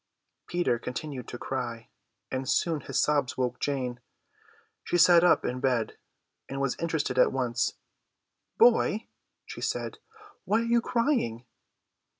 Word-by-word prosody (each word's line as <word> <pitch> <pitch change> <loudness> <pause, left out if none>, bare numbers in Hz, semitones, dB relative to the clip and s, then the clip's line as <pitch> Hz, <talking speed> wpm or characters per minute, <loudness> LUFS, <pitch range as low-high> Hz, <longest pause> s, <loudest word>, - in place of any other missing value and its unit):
Peter 175 -9 0
continued 125 0 -6
to 120 - -6
cry, 120 -3 -4 0.4
and 130 0 -3
soon 160 -4 +1
his - - -2
sobs 145 -3 +1
woke 125 -1 -1
Jane. 130 -4 -2 0.8
She 175 - 0
sat 170 0 +7
up 180 - +4
in 125 +1 -2
bed, 125 -4 0 0.5
and 135 - -4
was 140 -2 0
interested 160 -6 -1
at - - +5
once. 125 -3 0 0.8
"Boy," 230 -2 +4 0.4
she - - -8
said, - - -3 0.4
"why 215 +4 +2
are - - -2
you 235 0 +3
crying?" 230 - 0
135 Hz, 135 wpm, -28 LUFS, 125-175 Hz, 0.8 s, sat